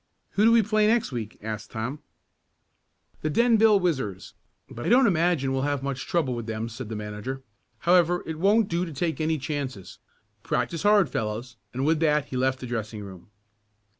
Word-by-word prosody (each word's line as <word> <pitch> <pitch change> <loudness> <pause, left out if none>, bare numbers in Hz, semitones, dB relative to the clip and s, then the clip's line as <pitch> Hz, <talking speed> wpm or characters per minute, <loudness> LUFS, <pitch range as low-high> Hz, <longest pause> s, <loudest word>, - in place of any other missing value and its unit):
"Who 210 - +2
do 230 - +6
we 230 -1 +5
play 215 +1 +2
next 230 -6 +2
week?" 115 -4 -5
asked 110 -1 -5
Tom. 125 +6 -4 1.2
"The 155 - -1
Denville 225 +2 +4
Whizzers, 135 - -2 0.3
but 120 - -8
I - - -1
don't 250 +3 +6
imagine 170 - +2
we'll 135 - 0
have 140 -1 -1
much 135 -1 -4
trouble 155 -7 0
with 120 -2 -5
them," 110 +1 -3
said 120 0 -7
the 110 - -4
manager. 105 +6 -5 0.4
"However, 175 0 +3
it 160 -1 -5
won't 205 +4 +4
do 170 0 -1
to 165 -3 -6
take 160 +3 -2
any 160 0 +1
chances. 135 - -5 0.4
Practice 165 - -1
hard, 205 -2 +5
fellows," 110 +3 -4 0.2
and 130 +2 -2
with 160 0 +2
that 150 -3 +2
he - - -5
left 130 +1 0
the - - -5
dressing 110 -3 -4
room. 95 -3 -11
140 Hz, 185 wpm, -26 LUFS, 120-175 Hz, 1.2 s, do